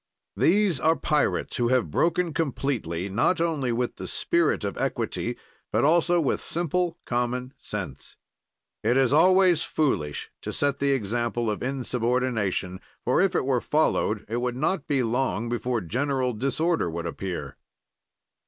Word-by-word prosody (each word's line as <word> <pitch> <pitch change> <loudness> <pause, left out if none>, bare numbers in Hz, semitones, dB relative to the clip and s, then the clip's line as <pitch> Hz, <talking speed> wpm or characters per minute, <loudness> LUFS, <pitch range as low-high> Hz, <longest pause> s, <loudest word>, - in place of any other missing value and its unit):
"These 170 - +3
are 160 +1 +3
pirates 150 -3 0
who 120 - +2
have 120 -10 +1
broken 170 - +1
completely 125 - -2
not 115 - +1
only 155 -7 0
with 120 +1 -2
the - - -6
spirit - - +1
of - - -3
equity, - - -2 0.3
but - - +2
also 170 +2 +4
with 150 - 0
simple 175 +1 -1
common 125 +2 -2
sense. - - -6 0.7
"It 120 +4 +3
is 135 0 +3
always 180 +1 +5
foolish 75 - -1
to - - -4
set 140 -1 +1
the 140 0 +2
example 120 -1 -1
of 105 - -4
insubordination, 120 -7 -1 0.2
for, 125 - +3
if 195 -1 +2
it - - +1
were 130 -3 +1
followed, 130 -8 +1
it 115 +3 -2
would 125 0 -1
not 160 +3 0
be 135 -3 +1
long 120 -1 -1
before 120 0 -1
general 130 - -1
disorder 140 - 0
would 85 +1 -4
appear. 90 +2 -5
130 Hz, 145 wpm, -26 LUFS, 115-155 Hz, 0.7 s, always